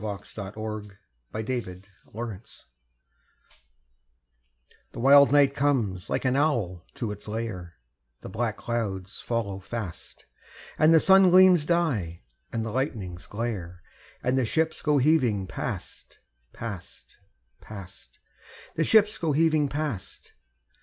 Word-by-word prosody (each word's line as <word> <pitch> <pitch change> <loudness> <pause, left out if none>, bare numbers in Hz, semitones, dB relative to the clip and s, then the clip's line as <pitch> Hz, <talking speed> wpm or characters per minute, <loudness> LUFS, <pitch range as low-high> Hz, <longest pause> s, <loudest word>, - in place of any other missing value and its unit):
God 105 -2 -5
Help 100 0 -7
Our 110 0 -4
Men 100 -1 -16 0.4
at 110 0 -3 1.0
Sea - - -18 2.3
The - - -7
wild 140 +3 +7
night 140 -1 +5
comes 120 -11 0
like - - -1
an 130 0 +2
owl 115 - 0
to 115 -4 -3
its 105 +1 -9
lair, 105 -6 -5 0.5
The - - -8
black 115 -1 -2
clouds 105 -5 -3
follow 105 -5 -2
fast, 100 -3 -7 0.5
And 155 +1 +6
the 165 - +7
sun 190 +2 +6
gleams 180 -4 +6
die, 125 - 0 0.3
and 115 -1 -2
the 115 - -4
lightnings 105 - -3
glare, 100 -6 -5 0.4
And 130 +2 +2
the 130 - +1
ships 160 +6 0
go 150 -1 +2
heaving 130 -9 +2
past, - - -6 0.3
past, 100 -7 -9 0.4
past 100 -4 -12 0.6
The 165 - 0
ships 215 +4 +4
go 160 -3 0
heaving 155 -1 +3
past! 140 -10 -5
115 Hz, 125 wpm, -26 LUFS, 100-145 Hz, 2.3 s, wild